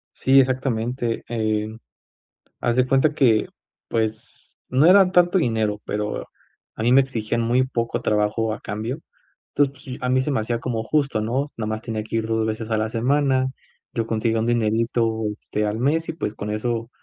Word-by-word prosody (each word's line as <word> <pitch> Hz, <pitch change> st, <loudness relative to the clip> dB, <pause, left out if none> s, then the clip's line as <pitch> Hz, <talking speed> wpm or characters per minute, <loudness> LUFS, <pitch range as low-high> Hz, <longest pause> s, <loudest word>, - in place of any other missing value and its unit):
Sí, 135 Hz, +1 st, +4 dB
exactamente, 125 Hz, -2 st, -1 dB
em. 110 Hz, -1 st, -1 dB, 0.8 s
Haz 120 Hz, +1 st, +1 dB
de 130 Hz, 0 st, +3 dB
cuenta 135 Hz, +3 st, +3 dB
que, 115 Hz, -7 st, +3 dB, 0.4 s
pues, 110 Hz, -1 st, -4 dB
no 130 Hz, +5 st, +4 dB
era 185 Hz, 0 st, +7 dB
tanto 180 Hz, +1 st, +4 dB
dinero, 110 Hz, -, 0 dB
pero 105 Hz, 0 st, -3 dB, 0.5 s
a -, -, -6 dB
mí 120 Hz, +2 st, +3 dB
me 135 Hz, -, +7 dB
exigían 115 Hz, -3 st, -2 dB
muy 120 Hz, +3 st, +2 dB
poco 115 Hz, -1 st, -2 dB
trabajo 105 Hz, +1 st, +1 dB
a -, -, -8 dB
cambio, 115 Hz, +8 st, -4 dB, 0.5 s
entonces 140 Hz, -1 st, +1 dB
pues 130 Hz, -1 st, -6 dB
a 125 Hz, -, -1 dB
mí 130 Hz, 0 st, +3 dB
se 145 Hz, -, -1 dB
me 130 Hz, -, +1 dB
hacía 115 Hz, +2 st, -2 dB
como 115 Hz, -3 st, -2 dB
justo, 140 Hz, -3 st, 0 dB
¿no? 130 Hz, +6 st, -1 dB
Nada 110 Hz, -2 st, -3 dB
más 110 Hz, 0 st, -3 dB
tenía 110 Hz, -2 st, -3 dB
que 110 Hz, -, -6 dB
ir 110 Hz, -, -1 dB
2 110 Hz, 0 st, 0 dB
veces 110 Hz, +1 st, -4 dB
a 110 Hz, -, +2 dB
la 110 Hz, 0 st, 0 dB
semana. 130 Hz, +2 st, +1 dB, 0.4 s
Yo 115 Hz, -1 st, -1 dB
conseguí 115 Hz, 0 st, 0 dB
un 110 Hz, 0 st, +1 dB
dinerito 115 Hz, 0 st, +1 dB
este 105 Hz, 0 st, -3 dB
al 105 Hz, +1 st, -2 dB
mes 160 Hz, +6 st, +1 dB
y -, -, -2 dB
pues 150 Hz, -10 st, -3 dB
con 105 Hz, -, -6 dB
eso, 115 Hz, +2 st, -2 dB
115 Hz, 185 wpm, -23 LUFS, 110-130 Hz, 0.8 s, era